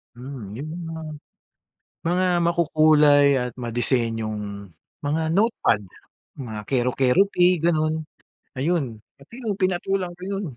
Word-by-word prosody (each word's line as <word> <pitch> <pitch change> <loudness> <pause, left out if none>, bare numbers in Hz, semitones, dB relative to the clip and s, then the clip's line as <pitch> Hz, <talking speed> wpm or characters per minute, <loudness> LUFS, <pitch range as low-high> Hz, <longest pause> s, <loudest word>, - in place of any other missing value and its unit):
Hmm, 125 -5 -8
yung 145 +3 -6 0.2
mga 160 - -6 1.1
mga 180 +2 +2 0.2
makukulay 155 -3 +4
at 125 -1 -2
madisenyong 110 -5 -1 0.3
mga 155 +3 0
notepad, 220 - +2 0.6
mga 110 -5 -5
kero-Keroppi, 135 +9 +2 0.2
gano'n, 155 -2 +2 0.6
ayun. 135 -7 -1 0.2
Pati 140 +10 -19
yun 210 -4 -2
pinatulan 185 -1 -1
ko 180 - -13
yun, 200 0 -3
145 Hz, 100 wpm, -23 LUFS, 120-175 Hz, 1.1 s, makukulay